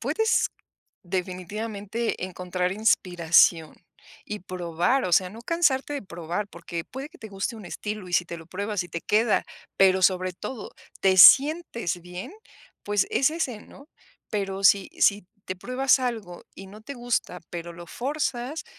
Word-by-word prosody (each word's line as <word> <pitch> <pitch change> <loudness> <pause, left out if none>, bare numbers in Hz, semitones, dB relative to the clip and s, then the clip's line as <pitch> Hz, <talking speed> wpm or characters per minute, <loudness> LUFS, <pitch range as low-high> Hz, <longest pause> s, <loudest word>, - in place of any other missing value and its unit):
puedes 445 0 +1 0.5
definitivamente 200 +4 -4
encontrar 180 0 -3
inspiración 175 -6 +3 0.5
y 210 0 -6
probar, 180 +7 -1
o 180 - -2
sea, 180 +1 +4
no 225 - -11
cansarte 290 -3 +1
de 285 - -4
probar, 175 +2 -5
porque 170 -2 -6
puede 270 +4 -8
que 360 - -18
te 220 - -9
guste 200 +4 -4
un 210 -5 -10
estilo, 210 -2 -6
y - - -10
si 175 - +3
te 170 0 -7
lo 165 - -13
pruebas 200 +1 -3
y - - -11
te 170 0 -5
queda, 220 +2 +2 0.3
pero 190 -1 +4
sobre 185 0 +2
todo 225 +5 -7 0.3
te 190 -1 +3
sientes 275 - +6
bien, 180 - -8 0.5
pues, 205 -1 +1
es 275 +3 +3
ese, 265 -10 -3
¿no? 280 +2 -16 0.4
Pero 195 -2 -3
sí, 195 -1 +5
si 200 -2 +3 0.2
te 185 - -4
pruebas 255 +6 +2
algo 220 -9 -4
y 195 - -10
no 210 +3 -13
te 280 - -7
gusta, 240 -7 -2
pero 170 0 -6
lo 170 0 -10
fuerzas, 275 - -3
200 Hz, 160 wpm, -25 LUFS, 180-240 Hz, 0.5 s, sientes